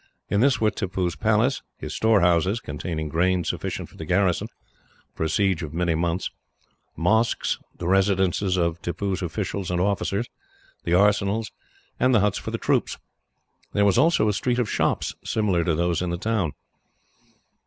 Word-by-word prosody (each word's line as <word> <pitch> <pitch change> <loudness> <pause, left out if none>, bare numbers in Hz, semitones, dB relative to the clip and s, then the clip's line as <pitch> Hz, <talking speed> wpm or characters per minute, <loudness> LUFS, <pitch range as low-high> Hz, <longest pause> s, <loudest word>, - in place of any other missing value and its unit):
In 100 - +2
this 130 +1 +3
were 110 -1 +3
Tippoo's 95 -3 -2
palace, 110 +5 +2 0.2
his - - -6
storehouses 95 -2 +3
containing 80 -1 -4
grain 90 +3 +1
sufficient - - -3
for - - -19
the - - -6
garrison, 90 -2 +1 0.7
for 80 - -2
a - - -1
siege 95 -3 +1
of 80 -1 -6
many 85 -1 +1
months 85 +2 -1 0.6
mosques, 110 +8 +1 0.2
the 85 - -4
residences 95 0 +2
of 85 -1 0
Tippoo's 95 +2 -2
officials 90 +2 -3
and 90 -1 0
officers, 100 +3 0 0.6
the 85 - +2
arsenals, 105 +2 +2 0.5
and 130 -1 +4
the - - +6
huts 105 -1 +1
for - - -6
the - - -2
troops. - - 0 0.8
There 100 - +3
was 100 +3 +4
also 155 -6 +4
a 105 - +2
street 120 +5 0
of 125 -3 +1
shops, - - 0
similar 100 -6 +1
to 80 -2 +1
those 85 +1 0
in 90 - -1
the 85 - -2
town. 100 -5 -1
95 Hz, 165 wpm, -24 LUFS, 85-105 Hz, 0.8 s, the